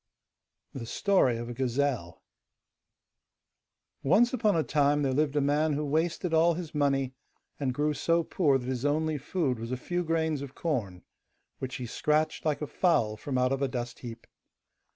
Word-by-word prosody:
THE 120 -4 -6
STORY 160 - +2
OF 120 +1 -5
A - - -4
GAZELLE 125 -6 -1 1.8
Once 210 - +4
upon 215 -5 +2
a 160 - +2
time 145 -1 +2
there 135 -1 +1
lived 150 +1 +1
a 145 - +3
man 150 +2 +2
who 150 +1 -1
wasted 165 +4 0
all 165 +1 +4
his 170 -2 -6
money, 135 -3 +1 0.5
and 135 -3 0
grew 150 +4 0
so 165 +3 +1
poor 150 -5 +2
that 125 - -7
his 130 -1 -2
only 155 +1 +1
food 135 -4 -1
was 115 +2 -5
a 130 - -1
few 175 +7 -2
grains 160 -3 0
of 140 -1 -8
corn, 110 - -2 0.6
which 130 -1 -4
he 125 - -4
scratched 150 +7 0
like 150 -1 0
a - - 0
fowl 115 - +2
from 130 +5 -3
out 125 0 +2
of 135 0 -1
a 140 - +2
dust 120 -2 -5
heap. 115 -2 -9
145 Hz, 175 wpm, -29 LUFS, 130-160 Hz, 1.8 s, Once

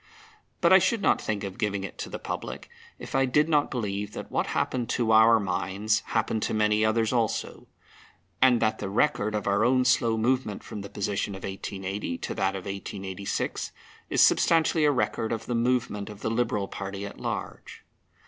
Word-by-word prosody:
But 170 0 +5
I 190 - +9
should 220 +3 +1
not - - +3
think 105 -2 -2
of 95 +1 -6
giving 100 -3 -1
it 95 - -8
to - - -4
the - - -5
public - - -6 0.3
if - - -9
I 135 0 +3
did 150 +4 +3
not 150 -3 +2
believe 105 -4 -3
that - - -7
what - - 0
happened 125 -2 -1
to 115 -2 +1
our 110 +1 +7
minds 100 +2 0
happened 110 -1 0
to - - -1
many 105 0 +2
others 110 +1 +2
also, 115 -3 -1 0.7
and 125 -2 +6
that 110 0 +1
the 100 - -4
record 110 -1 +1
of 105 - -2
our 100 +2 +2
own 130 +1 +3
slow 115 -2 +3
movement 120 -2 0
from 105 - -7
the 100 - -8
position 100 0 -2
of 95 - -10
1880 95 -1 -4
to - - -4
that 95 +1 0
of 95 - -6
1886 100 0 -4 0.4
is - - +2
substantially 160 -1 +4
a 145 - +5
record 115 -4 -1
of 115 - -3
the 120 - -3
movement 115 -3 0
of 105 -1 -10
the 110 - -1
Liberal 115 -4 0
party 100 +1 -6
at 100 - -9
large. - - -6
110 Hz, 190 wpm, -27 LUFS, 100-120 Hz, 0.7 s, I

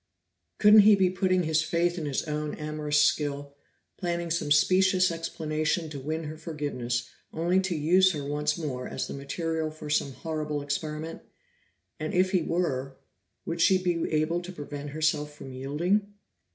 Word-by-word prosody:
Couldn't 210 +1 +8
he 210 0 +8
be 190 -2 +2
putting 185 -1 +1
his 160 -1 +2
faith 170 +2 0
in 160 -4 -4
his 140 - -1
own 150 -1 -3
amorous 150 -1 -1
skill, 145 -1 +1 0.4
planning 170 -2 -2
some 160 -3 -1
specious 185 +4 +4
explanation 160 -1 -2
to 145 - -5
win 155 +4 -3
her 155 0 -6
forgiveness 125 -7 -3 0.2
only 175 +3 +1
to 190 -2 -1
use 180 +5 +4
her 145 -2 -4
once 150 +2 -1
more 130 -6 -4
as - - -3
the - - -7
material 160 +3 -3
for 155 -1 -8
some 140 -2 +1
horrible 150 -1 -3
experiment? 155 +2 -4 0.8
And 155 +2 -3
if 185 +1 +3
he 185 -3 +2
were, 135 -6 -2 0.5
would 170 0 -2
she 190 +2 +5
be 175 -2 -1
able 155 +3 +1
to 180 +1 -8
prevent 145 -3 -7
herself 150 0 -1
from 135 -2 -9
yielding? 170 +11 0
155 Hz, 165 wpm, -27 LUFS, 150-175 Hz, 0.8 s, Couldn't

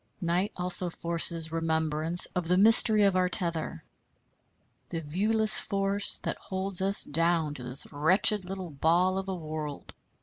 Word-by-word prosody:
Night 180 +2 -2
also 180 0 +2
forces 165 -1 -2
remembrance 160 0 +2
of 180 -2 -3
the 180 +1 +1
mystery 215 +1 +5
of 195 -2 +1
our 185 0 0
tether, 170 - -4 1.1
the 165 - -5
viewless 210 +8 +2
force 200 0 -2
that - - -4
holds 190 -1 -4
us 195 +1 +5
down 165 0 -1
to 135 - -9
this 125 +2 +1
wretched 190 +7 +2
little 185 -2 -8
ball 175 +6 0
of 195 0 -7
a 190 - -4
world. 155 -3 -8
175 Hz, 145 wpm, -27 LUFS, 160-195 Hz, 1.1 s, mystery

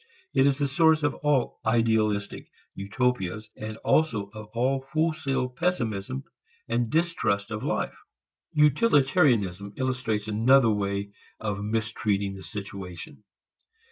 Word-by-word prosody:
It 135 - +4
is 140 -1 +2
the 145 -1 +1
source 160 +2 +3
of 145 - +2
all 145 -4 0
"idealistic" 110 -2 +1 0.2
utopias 110 -1 -2
and 110 0 -6
also 110 -11 +2
of 110 0 -9
all 135 +3 0
wholesale 155 -5 0
pessimism 115 - -2 0.4
and 120 0 0
distrust 115 -12 0
of 110 0 -3
life. - - -1 0.6
Utilitarianism 135 - +3
illustrates 125 -5 -1
another 115 +3 +4
way 100 -1 -2 0.3
of 105 -2 -3
mistreating 105 -2 -1
the 95 - -9
situation. 95 -1 -8
115 Hz, 110 wpm, -26 LUFS, 100-135 Hz, 0.6 s, It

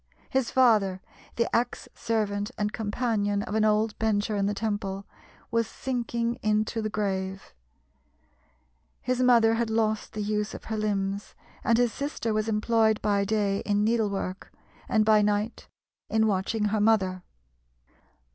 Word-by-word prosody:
His 260 -3 +1
father, 215 -7 +3 0.4
the 235 - +1
ex 240 +1 -1
servant 210 -2 -1
and 210 0 -1
companion 205 -2 -1
of 210 - -6
an 220 0 +2
old 215 0 +2
Bencher 215 -1 +1
in 200 -1 +1
the 205 - -1
Temple, 200 -2 -3 0.5
was 230 -1 +1
sinking 235 -1 -2
into 215 +1 0
the 215 - -2
grave; 190 -2 -3 1.5
his 255 0 -1
mother 235 -3 +5
had 230 0 0
lost 220 -1 0
the 215 -1 -3
use 210 0 -2
of - - -9
her 220 - -4
limbs, 200 -1 -2 0.3
and 230 - +3
his 245 -2 +2
sister 280 -6 -3
was 215 +1 0
employed 220 0 +2
by 205 -1 +2
day 200 -1 0
in 205 0 0
needlework, 205 -4 -1 0.4
and 215 -1 +3
by 215 -1 +5
night 210 +2 -1 0.4
in 220 0 +2
watching 210 +1 0
her 215 - +2
mother. 195 -4 +2
215 Hz, 145 wpm, -27 LUFS, 205-225 Hz, 1.5 s, mother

